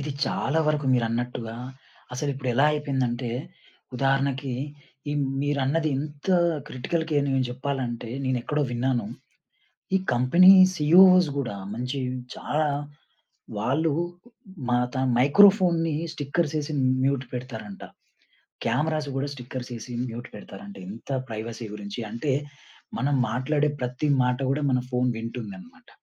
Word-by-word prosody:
ఇది 145 +2 -3 0.2
చాలా 150 +4 0
వరకు 150 -2 0
మీరన్నట్టుగా 115 -1 -2 0.6
అసలిప్పుడు 135 -1 -3
ఎలా 135 +5 +5
అయిపోయిందంటే 130 -5 -1 0.7
ఉదాహరణకి, 135 0 +1 0.6
ఈ - - 0 0.3
మీరన్నది 145 +2 +1
ఇంత 145 +3 -7 0.4
క్రిటికల్‌కేర్‌ని 145 +1 -1
నేను 130 -1 +1
జెప్పాలంటే 125 -3 -3
నేనేక్కడో 130 +3 0
విన్నాను. 120 -2 0 0.9
ఈ - - +7 0.2
కంపెనీ 140 +10 +7 0.2
సిఇఓ‌స్ 180 +2 +7
గూడా 125 -7 -2 0.2
మంచి 125 +4 -3 0.4
చాలా 155 0 0 0.9
వాళ్ళు 140 +9 +1 0.8
మాతన్ 125 +1 +1
మైక్రోఫోన్‌ని 170 - +5 0.2
స్టిక్కర్స్ 155 +1 -1
ఏసి 150 +1 -5 0.3
మ్యూట్ 135 -1 +1
పెడతారంట. 115 -5 -7 0.8
క్యామరాస్ 150 +5 0
గూడా 135 +1 -1
స్టిక్కర్స్ 125 -1 -7
ఏసి 115 +2 -8 0.2
మ్యూట్ 120 +1 -7
పెడతారంట 100 -1 -10
ఇంత 110 +3 -11 0.2
ప్రైవసీ 115 +1 -5
గురించి. 105 +2 -6
అంటే 120 +6 -1 0.7
మనం 140 +2 +1 0.2
మాట్లాడే 145 +5 +1
ప్రతి 125 +4 -2 0.2
మాట 125 0 +1
గూడా 145 +2 0
మన 125 -1 +2
ఫోన్ 125 0 +1
వింటుందన్నమాట. 190 - -8
135 Hz, 110 wpm, -26 LUFS, 125-150 Hz, 0.9 s, ఈ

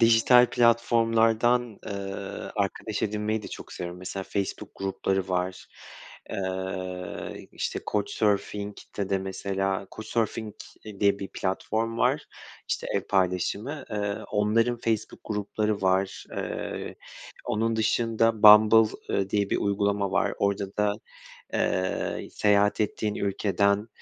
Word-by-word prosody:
dijital 115 +2 +6
platformlardan, 115 0 +3
eee, - - -5 0.7
arkadaş 100 +1 -2
edinmeyi 105 +1 -1
de - - -7
çok - - -9
seviyorum. 90 0 -6
Mesela 95 +1 -5
Facebook 100 -2 -3
grupları 95 0 -1
var, 90 0 -2 0.6
eee, 95 -1 -4
işte - - -3
Couchsurfing'de 105 -1 -1
de 95 - +2
mesela 95 0 -2
Couchsurfing, 110 -1 -2 0.3
eee, 105 -2 -10
diye 100 -1 +3
bir 95 - -5
platform 110 +5 -2
var, - - +2 0.5
işte - - -2
ev - - +2
paylaşımı, 100 - 0
eee, 105 -1 -1 0.2
onların 110 +3 +2
Facebook 115 -2 -2
grupları 105 0 -1
var. 95 +1 +1
Eee, - - -4 0.5
onun 115 +1 0
dışında 115 0 +1
Bumble, 110 +1 +8 0.2
eee, 95 0 0
diye 100 -1 +1
bir - - +2
uygulama 100 0 0
var. 100 - +1
Orada 100 -1 -1
da, 105 -1 +2 0.6
eee, 95 0 -1
seyahat 105 0 +3
ettiğin 105 0 -1
ülkeden 100 +1 +1
105 Hz, 115 wpm, -27 LUFS, 95-110 Hz, 0.7 s, Bumble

